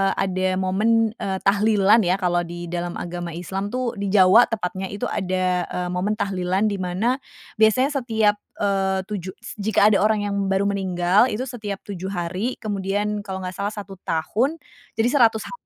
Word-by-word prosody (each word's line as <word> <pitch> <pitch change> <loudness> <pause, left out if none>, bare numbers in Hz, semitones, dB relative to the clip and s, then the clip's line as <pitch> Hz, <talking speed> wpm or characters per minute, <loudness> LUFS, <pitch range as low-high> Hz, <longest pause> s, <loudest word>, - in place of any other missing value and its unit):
ada 185 -1 0
momen, 215 +4 +2
eee, 190 -1 -2
tahlilan 205 +1 +4
ya, 180 -2 +2
kalau 175 -3 0
di 175 0 -7
dalam 175 0 -3
agama 175 -1 -5
Islam 190 +3 -4
tuh, 250 +1 -2
di 200 - -2
Jawa 195 +4 +6
tepatnya, 190 -3 -3
itu 200 +1 -7
ada, 185 -1 0
eee, 180 0 -3
momen 190 +4 -1
tahlilan 195 +1 0
di 200 - -3
mana 200 +9 0 0.4
biasanya 235 +6 +4
setiap, 220 -4 +1 0.2
eee, 190 -1 +1
7 190 -2 -6
s 230 -1 -10
jika 205 0 +2
ada 200 - +3
orang 215 0 +2
yang - - -2
baru 195 +1 +1
meninggal 190 +1 +2
itu 245 0 -2
setiap 215 -6 -6
7 190 -2 -6
hari 190 +5 -3
kemudian 205 0 -2
kalau 190 -2 -6
nggak 180 - -3
salah 200 +2 -2
1 200 -2 -8
tahun 220 - 0 0.4
jadi 225 +1 +2
100 230 -6 +3
ha - - -9
195 Hz, 175 wpm, -23 LUFS, 185-215 Hz, 0.4 s, Jawa